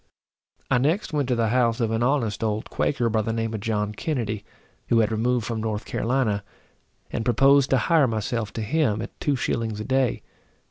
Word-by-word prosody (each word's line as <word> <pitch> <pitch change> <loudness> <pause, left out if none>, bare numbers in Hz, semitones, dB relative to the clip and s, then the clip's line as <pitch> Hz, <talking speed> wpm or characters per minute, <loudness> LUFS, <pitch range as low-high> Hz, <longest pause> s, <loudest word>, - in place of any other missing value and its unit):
I 125 - +4
next 160 +7 0
went 145 -3 0
to 125 - +1
the 115 -2 +1
house 120 0 +2
of 115 -2 0
an 115 +1 0
honest 120 -5 0
old 110 0 -2
Quaker, 120 -4 0
by 110 -1 +1
the 115 - -2
name 115 0 -2
of 110 - -3
John 105 -1 -1
Kennedy, 110 -6 -3 0.4
who 120 - +3
had 110 -1 +3
removed 120 +1 0
from 115 -2 -3
North 110 -1 -3
Carolina, 115 -4 0 0.7
and 115 - -2
proposed 135 +4 +4
to 135 - +4
hire 150 +4 +3
myself 115 0 -2
to 110 - -3
him, 110 -3 +1
at - - -10
two 145 - +1
shillings 115 -3 -2
a 110 - -4
day. 130 -2 +1
115 Hz, 195 wpm, -24 LUFS, 110-130 Hz, 0.7 s, I